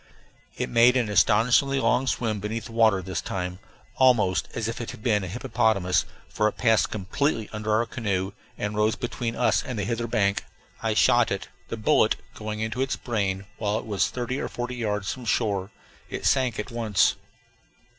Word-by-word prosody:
It - - -1
made 120 +2 +5
an 120 -4 0
astonishingly 125 +7 +4
long 130 0 +2
swim 110 -4 0
beneath 110 +2 -4
the - - -9
water 110 -4 +3
this 95 -2 -3
time, 90 -1 -4 0.4
almost 110 -9 +3
as 110 -1 -2
if 115 +1 -4
it 115 - -5
had 105 - -9
been 105 -4 +2
a - - -4
hippopotamus, 105 -3 +1 0.2
for 105 - +1
it 105 - -3
passed 115 -3 +3
completely 110 +3 -1
under 105 0 -3
our 110 +2 +3
canoe 100 -5 -2 0.3
and 105 0 -3
rose 105 +1 +2
between 120 -1 -3
us - - +2
and 125 -3 -5
the 100 - -1
hither 115 +2 -2
bank. 100 -3 +1 0.4
I - - 0
shot - - +4
it, - - -4 0.2
the 115 - -5
bullet 110 - +3 0.2
going 110 0 -5
into 110 +3 -2
its 135 - 0
brain, 100 -5 -2
while 105 -1 0
it - - -5
was 100 -3 +1
thirty 125 +2 -3
or - - -3
forty 120 +1 -4
yards 105 -4 -1
from 125 -2 -10
shore. 100 -4 0 0.4
It - - -5
sank 130 -4 +2
at 105 +4 -4
once. 115 -4 +2
110 Hz, 185 wpm, -25 LUFS, 105-120 Hz, 0.4 s, made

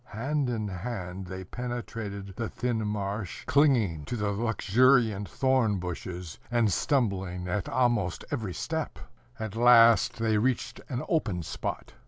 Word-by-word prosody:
Hand 140 +3 0
in 110 -3 -2
hand 95 -2 -5
they 95 +1 -6
penetrated 110 -3 -5
the 115 -2 -3
thin 110 -2 -2
marsh, 100 -2 -3
clinging 120 - +3
to 120 - -3
the 105 -3 -1
luxuriant 115 0 +3
thorn 130 -6 +2
bushes, 90 -1 -6
and 115 -5 +2
stumbling 95 - 0
at 90 +1 -2
almost 120 -8 +1
every 110 -10 -3
step. 160 -2 -3 0.4
At 110 -1 -4
last 115 -1 +6
they 110 -2 +2
reached 125 +2 -1
an 125 -2 -2
open 115 - 0
spot. - - -5
110 Hz, 135 wpm, -28 LUFS, 95-120 Hz, 0.4 s, last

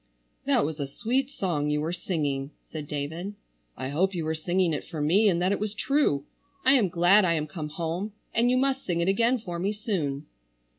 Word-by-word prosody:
"That - - +3
was 155 0 -4
a 140 - -2
sweet 250 - -1
song 170 - -1
you 150 0 +1
were 160 +3 -2
singing," 145 -7 -2 0.2
said 155 -2 -5
David. 160 +8 -4 0.4
"I 130 - -4
hope 185 +7 +1
you 165 -3 -2
were 160 - 0
singing 175 +2 +1
it 150 - -2
for 165 -3 -7
me, 190 +9 +4
and 170 -3 +1
that 185 - +2
it 200 - 0
was 210 0 -3
true! 235 - +1 0.4
I 260 - +6
am 230 -9 +4
glad 175 +4 +5
I 170 -2 +3
am 155 -2 0
come 155 0 -6
home, 170 +6 -3 0.2
and 235 +2 +3
you 255 - +3
must 270 +1 +1
sing 175 -2 -1
it 170 - +1
again 230 +6 +3
for 175 -7 -6
me 195 +4 0
soon." 165 -10 -2
175 Hz, 215 wpm, -27 LUFS, 150-210 Hz, 0.4 s, I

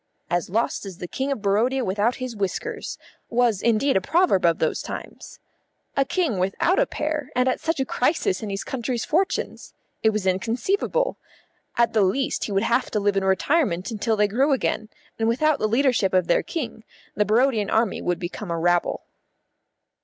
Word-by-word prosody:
"As 175 0 0
lost 225 +5 0
as 195 -4 -8
the 180 - -6
King 265 +9 -2
of 230 -7 -3
Barodia 235 +6 +2
without 205 +6 +1
his 255 -3 -5
whiskers" 195 -3 -3 0.3
was 235 -4 +2
indeed 235 +4 +2
a 190 - +3
proverb 325 - +2
of 165 - +2
those - - 0
times. - - -8 0.6
A 275 - +4
King 275 - 0
without 195 - +1
a - - +3
pair, 300 -2 -3
and 250 +1 +2
at 255 - +1
such 325 -2 -1
a 265 - +1
crisis 255 - 0
in 215 - -4
his 195 0 -3
country's 245 -2 -3
fortunes! 375 +5 -1 0.3
It 220 - +4
was 215 -3 -2
inconceivable. 250 - 0 0.6
At 235 0 +3
the 220 - +3
least 255 +8 +1
he - - -5
would 195 +1 +1
have 235 +2 +1
to 210 - 0
live 205 0 +1
in 195 - +1
retirement 190 - +1
until 220 +1 0
they 210 -1 +3
grew 265 +8 +2
again, 220 -4 -1 0.3
and 225 - +1
without 290 +6 +2
the 215 - +1
leadership 235 -5 +2
of 185 -2 +3
their 170 - +3
King 245 -8 -5 0.3
the 210 - +2
Barodian 220 0 +2
army 225 -2 +1
would 175 -1 0
become 180 +2 -6
a 170 - -1
rabble. 175 +1 +1
225 Hz, 185 wpm, -24 LUFS, 195-265 Hz, 0.6 s, A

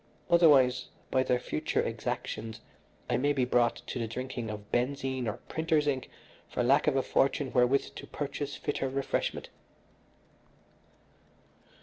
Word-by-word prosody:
Otherwise, 145 -7 +5 0.2
by 130 - +3
their 125 -1 +2
future 75 - -2
exactions 110 0 -4 0.5
I - - +1
may 145 +3 +2
be 130 -3 +1
brought 120 -1 +3
to 125 - -4
the 115 - -1
drinking 125 0 -4
of 105 -1 -7
benzene 130 0 -1
or 105 - -2
printer's 160 -2 +1
ink 135 -3 -1 0.4
for - - -1
lack 135 +5 +4
of 150 - +3
a 135 - +2
fortune 135 +1 +1
wherewith 125 +2 +3
to - - -8
purchase 145 0 -4
fitter 140 -2 -2
refreshment." 135 +1 -2
130 Hz, 135 wpm, -30 LUFS, 125-140 Hz, 0.5 s, Otherwise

